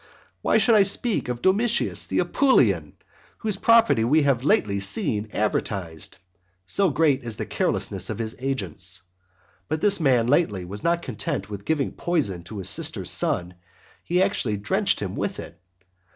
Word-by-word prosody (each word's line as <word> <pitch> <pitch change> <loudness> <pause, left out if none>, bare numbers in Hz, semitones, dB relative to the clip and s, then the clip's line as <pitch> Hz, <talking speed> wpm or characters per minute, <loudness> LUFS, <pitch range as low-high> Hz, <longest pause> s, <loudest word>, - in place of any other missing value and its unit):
Why - - +3
should 235 - +4
I 215 - +6
speak 200 - +1
of 120 -1 -4
Domitius 220 +5 +1
the - - -2
Apulian? 275 -2 +2 0.4
whose 215 -3 -1
property 230 - +4
we 150 +6 +3
have 135 -3 +1
lately 140 - +2
seen 105 +2 -1
advertised, 95 -6 -3 0.5
so 195 - +2
great 145 -2 +2
is 115 -2 -5
the - - -4
carelessness - - -2
of - - -3
his 110 -1 -4
agents. 100 -9 -3 0.6
But 155 +1 -2
this 205 +2 +4
man 130 -7 +3
lately 120 - +1
was 100 +3 -8
not 170 0 +1
content 105 -4 -4
with 100 0 -7
giving 150 -4 0
poison 135 - -2
to 105 +4 -9
his 95 -1 -4
sister's - - -1
son, 90 +1 0 0.5
he 180 +2 +2
actually 130 - -1
drenched 100 +1 +1
him - - -4
with - - -3
it. 85 - -10
125 Hz, 160 wpm, -24 LUFS, -, 0.6 s, I